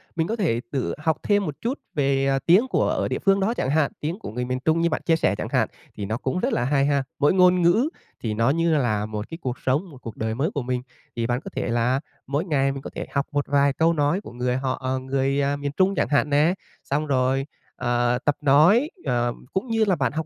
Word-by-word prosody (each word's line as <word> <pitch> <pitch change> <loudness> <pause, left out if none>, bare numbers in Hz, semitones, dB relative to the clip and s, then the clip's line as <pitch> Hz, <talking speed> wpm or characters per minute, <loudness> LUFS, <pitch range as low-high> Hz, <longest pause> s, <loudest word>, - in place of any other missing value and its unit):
mình 165 -1 0
có 225 - -1
thể 160 - 0
tự 135 -3 -1
học 155 +1 0
thêm 205 -1 +2
một 150 - -4
chút 250 +5 -2 0.2
về, 135 -2 +1
ờ, 135 0 +2
tiếng 190 +9 +5
của - - +1
ở - - 0
địa - - -2
phương 195 0 +3
đó 200 +4 +1
chẳng 130 - -2
hạn, 145 0 +2
tiếng 165 +6 -3
của - - -7
người 125 +3 -3
miền 125 +1 -2
Trung 160 +1 +3
như 170 - +2
bạn 155 - -2
chia 165 - +4
sẻ 160 - +1
chẳng - - -4
hạn, - - +2 0.3
thì 100 - -4
nó 110 +3 -2
cũng 135 +7 -2
rất 250 +5 0
là - - +1
hay 140 +1 +2
ha. 140 -1 +1 0.2
Mỗi 145 - +4
ngôn 180 -1 +5
ngữ 215 - +3 0.3
thì 110 -2 -1
nó 115 +4 +2
như 165 +2 +2
là 110 -6 0
một 105 0 -5
cái 165 - -6
cuộc 125 -3 -4
sống, 135 +6 +1 0.2
cuộc 115 -4 -8
đời 110 0 -2
mới 140 +7 0
của 145 - -1
mình, 125 0 -2 0.3
thì 115 -1 -1
bạn 120 +1 0
có - - -8
thể 130 - -2
là 120 +3 +1 0.3
mỗi 145 +5 -1
ngày 135 -5 +1
mình 135 0 -6
có - - -7
thể - - -4
học 140 0 0
một 145 -1 -1
vài 140 0 +3
câu 165 +4 +2
nói 155 +5 +1
của - - -10
người 125 +1 -1
họ 130 -1 -2
à, 130 - 0
người 135 +1 0 0.2
miền 145 0 -3
Trung 190 +1 +3
chẳng - - +1
hạn 145 0 +2
nè, 150 +4 +3 0.3
xong 150 +2 -1
rồi, 135 0 +1 0.3
ờ, 120 0 +1
tập 145 - +3
nói, 160 - +5 0.2
ờ, 120 0 0 0.2
cũng 190 +7 -1
như 225 -1 +2
là 190 -3 +2
bạn 125 -7 0
học 160 +1 -3
140 Hz, 260 wpm, -24 LUFS, 125-165 Hz, 0.3 s, tiếng